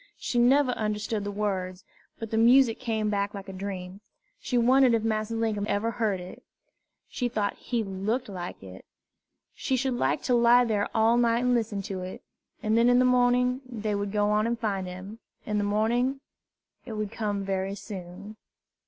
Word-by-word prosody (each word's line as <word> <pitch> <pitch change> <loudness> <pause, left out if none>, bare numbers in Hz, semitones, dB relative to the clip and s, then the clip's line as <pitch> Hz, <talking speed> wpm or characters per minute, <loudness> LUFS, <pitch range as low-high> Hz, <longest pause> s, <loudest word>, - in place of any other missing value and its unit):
She 240 - -1
never 260 +2 +4
understood 210 -1 -2
the 205 - -3
words, 190 -3 -3 0.3
but 225 -1 -7
the 220 - 0
music 240 0 +5
came 220 -4 -1
back 200 0 -1
like 195 0 -8
a 195 - -7
dream. 190 0 -6 0.4
She 250 - -2
wondered 250 +1 +5
if 225 - -1
Massa 215 0 -1
Linkum 220 -2 -1
ever 210 +3 0
heard 215 -5 -1
it. 180 +1 -10 0.7
She 245 -2 -2
thought 210 -4 -1
he 235 -2 -3
looked 210 +6 -2
like 180 - -7
it. 95 -1 -11 0.7
She 265 - -1
should 260 +1 0
like 245 +3 0
to 250 - +1
lie 240 +1 +5
there 210 -3 0
all 225 +1 +4
night 235 0 +2
and 250 0 +2
listen 220 -4 -1
to 190 -1 -5
it; 185 +1 -7 0.4
and 215 +1 +1
then 235 +1 +4
in 245 - +5
the 255 - +4
morning 250 +1 +3
they 220 -4 -4
would 200 0 -2
go 210 0 +1
on 210 +1 +2
and 235 0 -1
find 200 -5 -2
him, 185 +5 -8 0.3
in 210 -1 -1
the - - 0
morning; 235 +6 +1 0.6
it 235 - -8
would 215 -1 -3
come 205 -3 -2
very 195 0 -2
soon. 200 +1 -9
215 Hz, 190 wpm, -27 LUFS, 200-240 Hz, 0.7 s, music